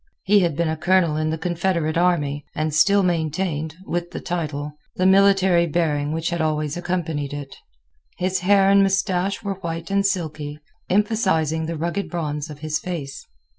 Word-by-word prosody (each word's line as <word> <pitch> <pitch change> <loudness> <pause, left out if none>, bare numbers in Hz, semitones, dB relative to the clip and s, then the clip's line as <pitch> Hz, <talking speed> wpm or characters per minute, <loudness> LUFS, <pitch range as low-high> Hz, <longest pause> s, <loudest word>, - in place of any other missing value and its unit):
He 205 +2 +5
had 170 -5 +1
been 170 +2 0
a 160 - 0
colonel 170 -1 +2
in 155 0 0
the 160 - -1
Confederate 170 -2 -1
army, 150 -5 +1
and 155 0 -1
still 200 +6 +4
maintained, 160 -2 -1
with 175 -1 -3
the - - -6
title, 150 -4 -3 0.2
the 185 - 0
military 190 -2 +5
bearing 150 -3 0
which 165 +2 -2
had 170 -1 -1
always 155 -1 -1
accompanied 165 -5 -2
it. 145 -1 -7 0.6
His 185 +1 0
hair 195 +1 +4
and 200 0 +6
mustache 195 +1 0
were 195 -2 -3
white 165 +1 -5
and 200 0 +2
silky, 155 -6 -2 0.3
emphasizing 180 -6 +1
the 165 -1 -3
rugged 170 +5 -2
bronze 150 -3 -3
of 150 -1 -10
his 155 0 -1
face. 160 -7 -6
170 Hz, 170 wpm, -22 LUFS, 155-185 Hz, 0.6 s, and